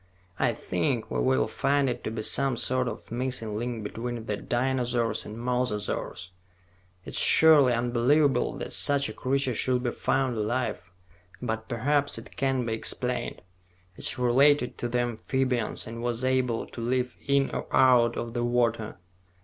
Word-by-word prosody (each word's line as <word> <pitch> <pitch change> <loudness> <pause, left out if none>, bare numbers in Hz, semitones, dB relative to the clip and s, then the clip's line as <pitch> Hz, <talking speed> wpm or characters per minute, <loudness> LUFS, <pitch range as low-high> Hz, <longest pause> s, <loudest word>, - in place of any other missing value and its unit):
"I - - +2
think 100 +7 -2
we - - -1
will 130 0 +2
find 140 0 +1
it 125 - -3
to - - -1
be 110 0 -4
some 135 +1 +2
sort 125 +1 0
of 110 -1 -7
missing 120 -3 -2
link 115 0 -3
between 115 +2 -5
the 105 - -1
dinosaurs 120 -2 -1
and 105 - -8
mososaurs. 115 -7 -2 0.8
It - - -7
is - - -1
surely 150 -6 +6
unbelievable 125 +3 +2
that - - -5
such 140 -1 +2
a - - -6
creature 135 0 0
should 125 +2 0
be 120 - 0
found 130 -2 0
alive; 120 +4 -1 0.6
but 110 -2 -4
perhaps 140 +5 0
it - - -11
can 135 -2 0
be 115 - -2
explained. 110 - -1 0.5
It - - -6
is - - -3
related 125 +2 +3
to 120 - -2
the 120 +1 0
amphibians 120 0 -1
and 115 +1 -7
was 120 0 -2
able 130 -3 +1
to 120 - -9
live 125 +1 -1
in 140 -1 +2
or - - -4
out 125 -3 +4
of 115 -1 -4
the 120 -1 -1
water. 115 -3 0
125 Hz, 165 wpm, -27 LUFS, 115-130 Hz, 0.8 s, surely